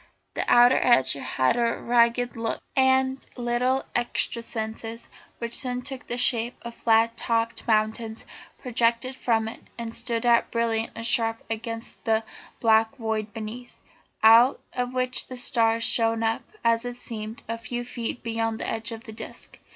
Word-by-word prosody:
The - - -1
outer 245 +1 +7
edge 130 - +4
had 135 - 0
a 235 -1 +1
ragged 240 +1 +2
look, 230 -1 -3
and 265 0 +3
little 250 +2 0
excrescences, 230 -1 -3 0.3
which 235 0 -5
soon 250 -1 -1
took 265 -1 -5
the 240 - -3
shape 240 0 +1
of 235 0 -7
flat 230 0 +2
topped 230 0 -1
mountains, 220 0 0 0.3
projected 240 0 0
from 225 -3 0
it 225 - -7 0.2
and 230 -1 -5
stood 235 0 -1
out 235 -1 +4
bright 230 -1 0
and 230 - -4
sharp 225 -1 +3
against 230 +1 -5
the 220 -1 +2 0.4
black 220 +1 +3
void 220 -3 -3
beneath, 225 +3 -8 0.4
out 230 +4 +7
of 250 0 -3
which 255 0 -1
the 255 - -7
stars 230 -2 +2
shone 225 -1 +2
up, 225 0 0 0.2
as 230 0 +3
it 245 0 -6
seemed, 220 -2 -7
a 230 +1 -4
few 240 +1 -5
feet 240 0 -5
beyond 225 -1 -1
the - - -4
edge 225 +1 -3
of 225 0 -7
the 220 - -10
disc. 215 - -10
230 Hz, 160 wpm, -25 LUFS, 225-245 Hz, 0.4 s, outer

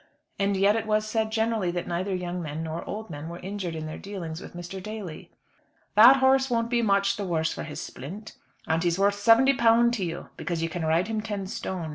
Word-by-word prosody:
And 200 0 +1
yet 200 +2 +4
it 225 -1 -2
was 215 0 +1
said 220 0 -1
generally 220 -4 0
that 175 0 -3
neither 185 +3 -1
young 180 0 -4
men 155 0 -4
nor 160 +1 -4
old 215 -2 -6
men 150 +2 -6
were 170 - -7
injured 185 -2 -5
in 155 -1 -5
their 155 - -6
dealings 175 -5 -6
with - - -11
Mr. 175 +2 -7
Daly. 210 -5 -7 0.6
"That 235 +5 +9
horse 265 0 +3
won't 230 -1 0
be 240 -1 +2
much 200 -2 +2
the 205 - -3
worse 160 -4 0
for - - -6
his 150 - -6
splint, 195 +11 -8 0.3
and 160 +1 +1
he's 170 0 +1
worth 200 +1 +3
£70 235 +2 +5
to 225 -5 -2
you, 170 0 -5
because 170 -2 -3
you 165 - -1
can 165 +1 -4
ride 165 +4 +2
him 220 -1 -2
ten 205 -3 -4
stone. 185 -3 -4
195 Hz, 220 wpm, -26 LUFS, 170-220 Hz, 0.6 s, That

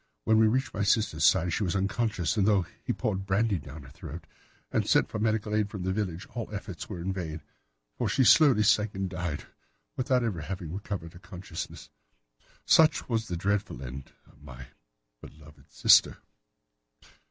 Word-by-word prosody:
When 110 - +3
he 110 - +5
reached 130 +5 0
my 100 - -3
sister's 100 -6 +1
side 90 0 +4
she 105 - 0
was 90 -1 -1
unconscious, 100 -1 -1
and 100 -2 +2
though 100 -4 +3 0.2
he - - -1
poured 95 -2 -2
brandy 100 0 +1
down 75 0 -10
her 65 - -13
throat - - -9 0.5
and - - 0
sent - - +3
for - - -4
medical 110 -1 0
aid 105 -1 +1
from 100 -4 -6
the 95 +1 -1
village, 95 -4 -3
all 115 -3 -5
efforts 100 -4 -7
were 95 -5 -6
in 95 +3 -2
vain, 80 -4 -5 0.6
for - - 0
she 135 - +2
slowly 130 -5 +6
sank 105 0 +2
and 95 0 -2
died 85 -5 -4 0.5
without 130 -1 +1
having 90 -4 -4
recovered 95 -4 -5
her 85 - -13
consciousness. 90 -3 -8 0.7
Such 160 -1 +4
was 115 -2 -1
the 90 - -3
dreadful 100 -7 -2
end 65 +1 -8
of - - -23
my 65 +1 -11 0.5
beloved 75 0 -16
sister." - - +5
95 Hz, 175 wpm, -28 LUFS, 85-110 Hz, 0.7 s, slowly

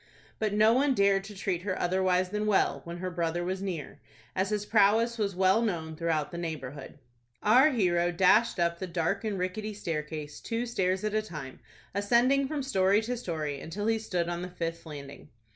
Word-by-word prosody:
But 215 -1 0
no 215 +2 +5
one 270 +2 +3
dared 200 -1 +3
to 210 0 -10
treat 190 -3 -2
her 185 -1 -3
otherwise 185 0 +1
than 210 +2 -2
well, 205 -2 +2
when 170 +1 -6
her 185 +1 -4
brother 170 0 -1
was 185 +2 -3
near, 180 -7 -5 0.4
as 190 +1 0
his 210 -1 -1
prowess 225 +3 +3
was 200 -3 -1
well 190 +4 +4
known 165 -8 -2
throughout 160 -2 -1
the 170 - -5
neighborhood. 145 -5 -6 0.5
Our 255 +8 +6
hero 175 - +2
dashed 195 +7 +4
up 170 0 +1
the 185 - -4
dark 175 +4 -1
and 210 -3 -2
rickety 205 +4 -3
stair 165 -6 -2
case, 150 -1 -7
two 230 +1 -3
stairs 190 -5 0
at 215 -1 -1
a 215 - +2
time, 150 -10 -8 0.3
ascending 240 +7 +3
from 295 -1 -3
story 200 -4 +2
to 245 +3 -2
story, 155 - -4
until 200 +6 -5
he 225 0 +2
stood 180 -6 -2
on 175 0 -3
the 180 - -5
fifth 170 -2 -5
landing. 145 -1 -9
190 Hz, 195 wpm, -29 LUFS, 170-215 Hz, 0.5 s, Our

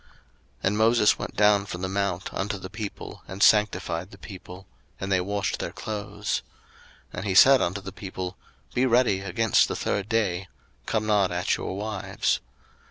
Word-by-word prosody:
02:019:014 - - -28 0.5
And 100 +2 +1
Moses 110 -1 +4
went - - -6
down 105 -1 +4
from 90 -2 -6
the - - 0
mount 95 -1 -2
unto 100 +1 -2
the 95 0 -9
people, 105 -1 -7
and 95 +1 -2
sanctified 95 -4 +3
the - - -14
people; 95 -1 -11 0.3
and 95 0 -4
they 90 -1 +3
washed 100 +2 -2
their - - -3
clothes. 105 -1 -3 0.7
02:019:015 - - -9
And - - -5
he 95 - 0
said 135 +6 +8
unto 95 +3 -1
the 95 - -7
people, 95 -1 -6 0.4
Be 130 +2 +2
ready 120 -5 +3
against 100 +3 +2
the - - -3
third 100 +1 -2
day: 95 -5 0 0.4
come 110 -1 0
not 105 -3 +3
at 90 0 0
your 95 - -5
wives. 105 -1 -1
100 Hz, 175 wpm, -26 LUFS, 95-105 Hz, 0.7 s, said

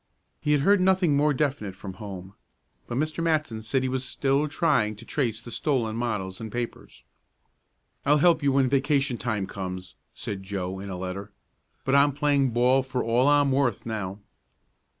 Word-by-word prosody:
He 150 0 +1
had 145 - +3
heard 200 +5 +4
nothing 185 -5 +3
more 150 +1 +3
definite 135 -9 -1
from 95 0 -8
home, 95 -2 -8 0.5
but 120 - -3
Mr. 155 +3 -1
Matson 155 -9 0
said 120 +4 0
he - - 0
was 130 0 -2
still 140 +3 0
trying 140 -9 +1
to 115 +3 -13
trace 115 -6 -1
the 120 - -10
stolen 120 -8 0
models 105 -4 -3
and 110 -1 -6
papers. 120 0 -6 1.0
"I'll 150 +1 +4
help 165 +1 +4
you 140 -1 +2
when 135 -1 +3
vacation 135 -1 +1
time 110 -5 -1
comes," 95 -1 -6 0.2
said 100 -2 -5
Joe 95 -1 -4
in 100 +1 -7
a 95 - -4
letter. 95 +3 -5 0.5
"But 135 - +1
I'm 140 0 +5
playing 140 -2 +2
ball 125 +3 +3
for 130 -1 -3
all 120 +4 +2
I'm 145 -1 +4
worth 130 -5 +1
now." 105 -4 -4
130 Hz, 175 wpm, -26 LUFS, 105-145 Hz, 1.0 s, I'm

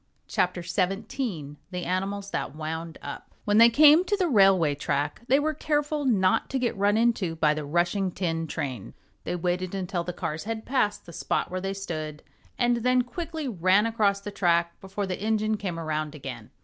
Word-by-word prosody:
CHAPTER 180 -1 0
17 190 - -2
The 180 -1 -4
Animals 195 +2 -2
That - - -3
Wound 160 +1 -5
Up - - -8
When 210 +1 +4
they 230 +1 +9
came 300 +7 +7
to 410 +2 0
the 370 -3 +1
railway 195 - +5
track 145 +3 -2
they 270 - +5
were 310 +1 0
careful 295 -1 -1
not 190 -7 +2
to 270 - -1
get 245 -2 0
run 205 +2 +2
into 220 -8 +1
by 155 -2 +3
the 155 0 -4
rushing 175 +5 +1
tin 165 -3 -2
train. 130 -8 -5 0.3
They - - -2
waited 180 +2 -2
until 180 -2 -2
the 180 - -4
cars 155 0 -4
had 220 0 -4
passed 255 -6 0
the 170 - -11
spot - - -1
where 185 0 -3
they 195 +1 -3
stood 155 -6 -5 0.3
and 240 -1 +2
then 250 +1 +2
quickly 320 +3 -5
ran 190 -1 +3
across 215 -3 +1
the 205 +1 -7
track 170 -3 +1
before 195 +1 -4
the 185 0 -4
engine 215 0 +1
came 185 -5 -4
around 155 -1 -3
again. 125 -6 -8
195 Hz, 190 wpm, -26 LUFS, 170-230 Hz, 0.3 s, they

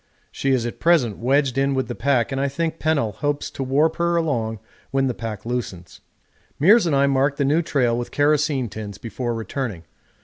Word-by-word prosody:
She 135 - -2
is 130 -3 +2
at 120 - -5
present 155 - +2
wedged 135 +2 +1
in 135 0 +1
with 130 -2 -1
the 120 - -4
pack, 130 -2 +1
and 135 0 -1
I 140 - +1
think 165 +3 -3
Pennell 145 -9 +1
hopes 145 +8 -2
to - - -7
warp 145 +5 +1
her 170 0 +1
along 120 -10 -1 0.3
when 135 0 +1
the 130 - 0
pack 115 -3 -6
loosens. 110 -8 -5 0.6
Meares 195 +6 +5
and 150 - +1
I 140 0 +4
marked 140 +1 +1
the 140 - +1
new 150 +5 +3
trail 125 -7 +1
with 120 0 -3
kerosene 145 -3 +1
tins 105 -2 -7
before 120 +2 -4
returning. 115 -4 -4
135 Hz, 200 wpm, -22 LUFS, 120-145 Hz, 0.6 s, Meares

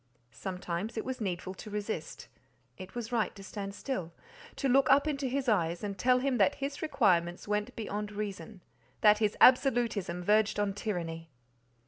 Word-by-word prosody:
Sometimes 180 - -4
it 220 - -2
was 260 -2 -4
needful 185 -2 -3
to 210 +3 -10
resist; 210 -5 -5 0.5
it 185 +3 -10
was 235 -1 -5
right 230 -3 0
to 200 - -11
stand 200 0 -6
still, 205 -10 -4 0.4
to 275 - -1
look 265 +1 +4
up 280 +3 +5
into 275 -2 -1
his 265 +1 -2
eyes 175 -5 +1
and 200 -1 -3
tell 250 +5 +3
him 260 0 0
that 285 - +4
his 280 +1 -4
requirements 180 - +1
went 210 +4 -1
beyond 210 -1 -4
reason—that 210 +1 -1
his 210 -2 +1
absolutism 235 -9 +4
verged 210 +2 +3
on 205 -1 0
tyranny. 165 -6 -4
210 Hz, 160 wpm, -31 LUFS, 185-245 Hz, 0.5 s, up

